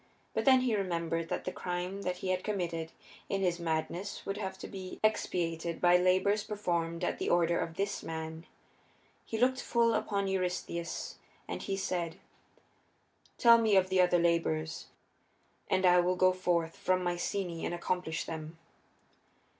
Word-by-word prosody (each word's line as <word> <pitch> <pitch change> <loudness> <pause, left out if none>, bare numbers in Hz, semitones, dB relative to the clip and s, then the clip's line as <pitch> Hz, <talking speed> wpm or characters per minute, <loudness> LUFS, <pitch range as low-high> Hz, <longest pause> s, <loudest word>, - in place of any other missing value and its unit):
But - - -1
then 260 -2 +7
he 245 -4 +1
remembered 170 -4 -1
that - - -3
the 185 - -2
crime 180 +2 -4
that 180 -2 -2
he 185 - -4
had 185 0 0
committed 170 -6 -2 0.4
in 195 - 0
his 175 -2 +1
madness 170 +4 -3
would 195 +1 -3
have 190 -2 -4
to - - -7
be 185 -2 -8
expiated 170 -6 0
by 175 0 +6
labors 185 +3 +3
performed 175 -5 -2
at - - -1
the - - -1
order 170 0 +3
of 165 - -3
this 200 +2 -2
man. 160 +1 -6 0.8
He 225 - -3
looked 255 +2 +2
full 235 -1 +2
upon 200 -2 0
Eurystheus 180 -2 -3 0.3
and - - -4
he 195 -1 -2
said, 175 -3 -2 1.2
"Tell 235 -1 +7
me 220 -3 +3
of 185 -1 +4
the 190 -1 +4
other 180 -1 +4
labors, 165 -2 0 0.8
and 190 0 +2
I 180 0 +6
will 180 +1 +2
go 185 0 +4
forth 170 -3 0
from 185 0 +1
Mycenæ 175 0 -2
and - - -2
accomplish 175 -2 -2
them." 160 0 -7
180 Hz, 160 wpm, -31 LUFS, 170-195 Hz, 1.2 s, then